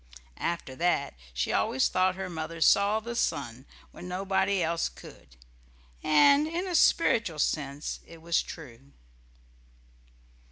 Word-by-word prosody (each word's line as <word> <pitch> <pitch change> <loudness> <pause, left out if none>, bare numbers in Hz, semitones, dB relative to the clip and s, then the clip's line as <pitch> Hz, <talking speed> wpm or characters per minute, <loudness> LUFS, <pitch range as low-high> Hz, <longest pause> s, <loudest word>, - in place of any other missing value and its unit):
After 170 -6 -3
that 170 -5 0 0.2
she - - -2
always 130 - +2
thought 185 0 +1
her 190 0 -5
mother 165 -1 -6
saw 200 +6 +4
the 235 +2 -6
sun 125 - -2 0.2
when 180 - -10
nobody 190 +1 0
else 165 +1 0
could. 65 -1 -15 0.7
And 280 - +5
in 340 +3 -3
a 360 - -3
spiritual 230 - +3
sense 145 -1 -2
it 165 - -13
was 165 0 +1
true. 140 -4 -11
170 Hz, 125 wpm, -28 LUFS, 150-200 Hz, 0.7 s, And